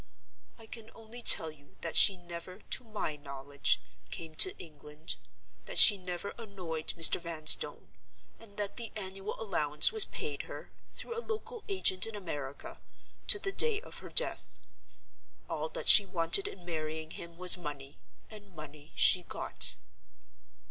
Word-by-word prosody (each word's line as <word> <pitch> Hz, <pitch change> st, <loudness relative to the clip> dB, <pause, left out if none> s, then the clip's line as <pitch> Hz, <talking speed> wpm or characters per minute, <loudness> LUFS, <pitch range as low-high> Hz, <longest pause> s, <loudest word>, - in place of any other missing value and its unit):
I 225 Hz, -, -14 dB
can 220 Hz, 0 st, -10 dB
only 225 Hz, +2 st, -11 dB
tell 160 Hz, -8 st, +6 dB
you 145 Hz, -2 st, -23 dB
that 165 Hz, -, -5 dB
she 195 Hz, -, +6 dB
never, 175 Hz, +1 st, -10 dB
to 255 Hz, -, -4 dB
my 210 Hz, -9 st, -5 dB
knowledge, 140 Hz, 0 st, -2 dB, 0.3 s
came 160 Hz, -1 st, -8 dB
to 380 Hz, +2 st, +2 dB
England; 150 Hz, 0 st, -8 dB, 0.5 s
that -, -, -6 dB
she 210 Hz, -, +10 dB
never 180 Hz, 0 st, -6 dB
annoyed 180 Hz, -8 st, -7 dB
Mr. 165 Hz, +1 st, +7 dB
Vanstone; 160 Hz, -2 st, 0 dB, 0.5 s
and 220 Hz, -3 st, -17 dB
that 205 Hz, -1 st, -4 dB
the 230 Hz, -2 st, -5 dB
annual 195 Hz, 0 st, -7 dB
allowance 150 Hz, -8 st, +3 dB
was 440 Hz, -2 st, +5 dB
paid -, -, -6 dB
her, -, -, -10 dB, 0.2 s
through 465 Hz, -, -7 dB
a 465 Hz, -, -4 dB
local 455 Hz, 0 st, -7 dB
agent 300 Hz, -, +2 dB
in 225 Hz, -, -8 dB
America, 145 Hz, -8 st, -8 dB, 0.5 s
to -, -, +5 dB
the 390 Hz, -1 st, -4 dB
day 445 Hz, +1 st, +2 dB
of 465 Hz, -, -10 dB
her -, -, -11 dB
death. -, -, +1 dB, 0.9 s
All -, -, -4 dB
that -, -, -6 dB
she 205 Hz, -3 st, +8 dB
wanted 180 Hz, -, +1 dB
in 180 Hz, -, -11 dB
marrying 160 Hz, -1 st, -5 dB
him 170 Hz, 0 st, -10 dB
was 180 Hz, 0 st, +3 dB
money; 145 Hz, -5 st, -9 dB, 0.3 s
and 205 Hz, -4 st, -14 dB
money 150 Hz, 0 st, -12 dB
she 180 Hz, -, +5 dB
got. -, -, 0 dB
180 Hz, 155 wpm, -30 LUFS, 155-225 Hz, 0.9 s, she